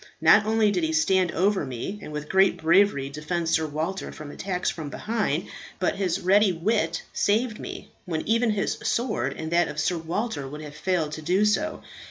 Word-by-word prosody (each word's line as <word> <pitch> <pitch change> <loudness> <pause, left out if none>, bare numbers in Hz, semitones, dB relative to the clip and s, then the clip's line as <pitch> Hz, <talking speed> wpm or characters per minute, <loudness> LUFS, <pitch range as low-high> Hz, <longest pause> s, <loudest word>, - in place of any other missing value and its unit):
Not 215 0 +6
only 220 -1 +3
did 180 -4 0
he 160 0 0
stand 180 +3 +2
over 195 +2 +2
me, 135 - -5
and - - -8
with 150 0 -5
great 190 0 +3
bravery 165 -3 +3
defend 160 +4 -3
Sir 160 -1 +2
Walter 160 +6 -3
from 150 -1 -9
attacks 180 +1 -3
from 155 -3 -6
behind, 210 -5 -1 0.3
but 185 - 0
his 185 -4 0
ready 195 +2 +4
wit 165 -1 0
saved 220 +2 +1
me, - - -8
when 160 -4 -3
even 230 +2 +2
his 210 -2 -1
sword 220 - -1
and 160 0 -5
that 175 +1 +3
of 150 - -5
Sir 170 +2 0
Walter 170 - -3
would 150 +3 -8
have 150 -1 -9
failed 175 -5 -1
to 155 - -6
do 185 +6 +2
so. 310 +10 0
180 Hz, 195 wpm, -25 LUFS, 155-205 Hz, 0.3 s, Not